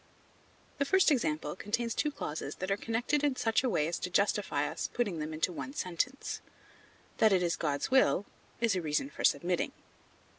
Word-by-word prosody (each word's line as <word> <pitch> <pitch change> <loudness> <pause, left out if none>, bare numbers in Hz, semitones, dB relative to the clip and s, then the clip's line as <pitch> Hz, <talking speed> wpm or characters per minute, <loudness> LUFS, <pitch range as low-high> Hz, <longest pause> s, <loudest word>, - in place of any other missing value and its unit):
The 280 - +2
first 380 +2 +4
example 155 - 0
contains 230 +4 -1
two 300 - +1
clauses 155 - -5
that 185 +1 -4
are - - +4
connected 240 +7 0
in 285 -3 +2
such 225 0 +1
a 255 - +2
way 150 -8 +1
as 170 - -2
to 180 - -3
justify 200 +3 +1
us - - -3
in - - -27
putting 205 -9 -1
them 155 +1 -3
into 160 +3 -1
one 265 - -6
sentence; 190 - -2 0.8
that 220 - +6
it 185 -2 +3
is 170 -1 +1
God's 145 - -1
will, 260 -6 +4 0.3
is 230 -4 +2
a 180 - 0
reason 160 - -1
for - - -6
submitting. - - +2
205 Hz, 190 wpm, -31 LUFS, 170-255 Hz, 0.8 s, that